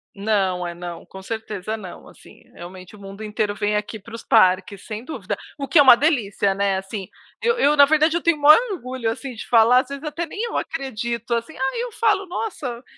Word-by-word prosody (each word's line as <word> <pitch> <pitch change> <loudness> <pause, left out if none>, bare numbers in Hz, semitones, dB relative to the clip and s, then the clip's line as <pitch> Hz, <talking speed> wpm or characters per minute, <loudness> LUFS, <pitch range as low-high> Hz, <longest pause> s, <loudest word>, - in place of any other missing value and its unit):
Não, 195 -3 0
é 170 - -6
não, 175 -1 -8
com 190 0 -11
certeza 220 -1 -5
não, 195 -5 -10
assim, - - -17
realmente, 185 +3 -11
o - - -16
mundo 195 +2 -10
inteiro 210 -1 -2
vem 210 0 -1
aqui 210 +1 -3
para 225 +4 -14
os 230 - -8
parques, 190 -2 +2
sem 215 +1 -6
dúvida, 315 - -5 0.2
o 275 -2 -4
que 295 - +4
é - - +10
uma 255 -3 +8
delícia, 220 -10 +1
né, 195 -1 0
assim, 195 0 -6 0.3
eu 470 0 +1
eu, 295 -8 +3
na 285 -1 +8
verdade, 310 +2 +2
eu 340 - 0
tenho 335 -1 +2
o - - -14
maior 305 +7 +8
orgulho, 255 -7 -4
assim, 255 +3 -5
de 230 - -9
falar, 235 +2 +5
às 255 - -2
vezes 280 +2 -7
até 330 +2 -4
nem 405 - -9
eu 470 - -4
acredito, 235 -3 -3
assim, 235 +7 -2
aí 265 - -1
eu - - -5
falo: 420 -4 +1
"Nossa." 280 - -5
230 Hz, 220 wpm, -22 LUFS, 200-290 Hz, 0.3 s, é